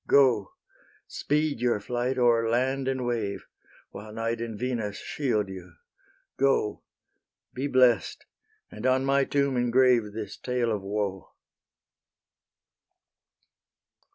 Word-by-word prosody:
Go; 125 Hz, -8 st, +4 dB, 0.5 s
speed 150 Hz, -2 st, -1 dB
your 120 Hz, -3 st, +2 dB
flight 120 Hz, +4 st, -2 dB
o'er 115 Hz, -2 st, +3 dB
land 130 Hz, +3 st, 0 dB
and 130 Hz, -1 st, -1 dB
wave, 115 Hz, -5 st, -2 dB, 0.5 s
While 105 Hz, +2 st, -9 dB
Night 115 Hz, +1 st, -3 dB
and 115 Hz, -2 st, -5 dB
Venus 115 Hz, -4 st, -3 dB
shield 115 Hz, -8 st, -1 dB
you; 90 Hz, -2 st, -10 dB, 0.6 s
go 135 Hz, -6 st, +1 dB, 0.7 s
Be 135 Hz, +3 st, -2 dB
blest: 125 Hz, -5 st, +2 dB, 0.5 s
and 110 Hz, +4 st, -3 dB
on 130 Hz, +1 st, +2 dB
my 135 Hz, 0 st, +3 dB
tomb 140 Hz, -1 st, 0 dB
engrave 120 Hz, -2 st, +3 dB
This 105 Hz, -1 st, -6 dB
tale 125 Hz, -2 st, -1 dB
of 105 Hz, -2 st, -2 dB
woe." 100 Hz, -1 st, -3 dB
120 Hz, 110 wpm, -27 LUFS, 105-130 Hz, 0.7 s, Go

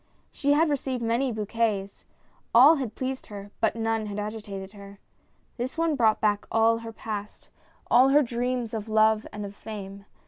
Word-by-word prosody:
She 285 Hz, 0 st, +1 dB
had 320 Hz, +3 st, +3 dB
received 260 Hz, -3 st, -2 dB
many 235 Hz, +3 st, +1 dB
bouquets, 215 Hz, -2 st, -2 dB, 0.5 s
all 280 Hz, +7 st, +8 dB
had 250 Hz, -6 st, -4 dB
pleased 260 Hz, 0 st, -4 dB
her, 205 Hz, -1 st, -9 dB
but 220 Hz, -, +1 dB
none 225 Hz, -1 st, -1 dB
had 205 Hz, 0 st, -6 dB
agitated 205 Hz, -2 st, -6 dB
her. 200 Hz, -1 st, -12 dB, 0.6 s
This 250 Hz, +4 st, -4 dB
one 330 Hz, -2 st, +1 dB
brought 225 Hz, -5 st, +3 dB
back 205 Hz, -1 st, 0 dB
all 225 Hz, +1 st, +3 dB
her 230 Hz, 0 st, -8 dB
past, 210 Hz, -2 st, -7 dB, 0.4 s
all 255 Hz, +2 st, +5 dB
her 295 Hz, +2 st, +5 dB
dreams 245 Hz, -1 st, -2 dB
of 220 Hz, -1 st, -4 dB
love 220 Hz, 0 st, +3 dB
and 210 Hz, -1 st, -6 dB
of 200 Hz, 0 st, -9 dB
fame. 200 Hz, -2 st, -8 dB
225 Hz, 170 wpm, -26 LUFS, 210-250 Hz, 0.6 s, all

